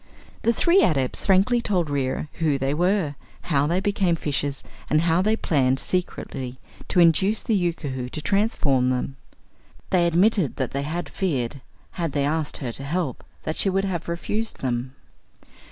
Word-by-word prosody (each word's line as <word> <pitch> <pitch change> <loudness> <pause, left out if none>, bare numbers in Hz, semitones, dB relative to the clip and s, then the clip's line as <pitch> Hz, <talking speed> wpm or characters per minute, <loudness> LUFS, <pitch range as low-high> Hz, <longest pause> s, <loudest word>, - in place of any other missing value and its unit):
The 230 - +3
three 345 +10 +4
Adepts 135 - +1
frankly 200 +6 +4
told 180 -7 0
Reera 140 0 -1
who 155 -4 +2
they 135 +1 0
were, 175 -1 +1 0.4
how 140 +1 +3
they 175 +3 +1
became 195 -3 +1
fishes 145 -3 -2 0.3
and 155 +1 +3
how 170 +1 +3
they 215 +3 +2
had 225 - -4
planned 135 -4 +2
secretly 130 -7 -3 0.3
to 180 - +1
induce 190 +5 +4
the 225 - 0
Yookoohoo 150 -9 -1
to 155 - -5
transform 150 - +2
them. 130 +1 -2 0.7
They 175 -2 +4
admitted 180 - +2
that 130 - -2
they 140 - -2
had 160 +5 -3
feared, 140 -8 -2 0.3
had 165 -5 -3
they 140 -1 +1
asked 155 0 -1
her 125 -4 -4
to 135 - -4
help, 150 -2 -2 0.2
that 155 - -3
she 195 - +2
would 195 +1 +1
have 175 -4 -3
refused 210 +6 -3
them. 130 +1 -2
160 Hz, 170 wpm, -24 LUFS, 140-190 Hz, 0.7 s, three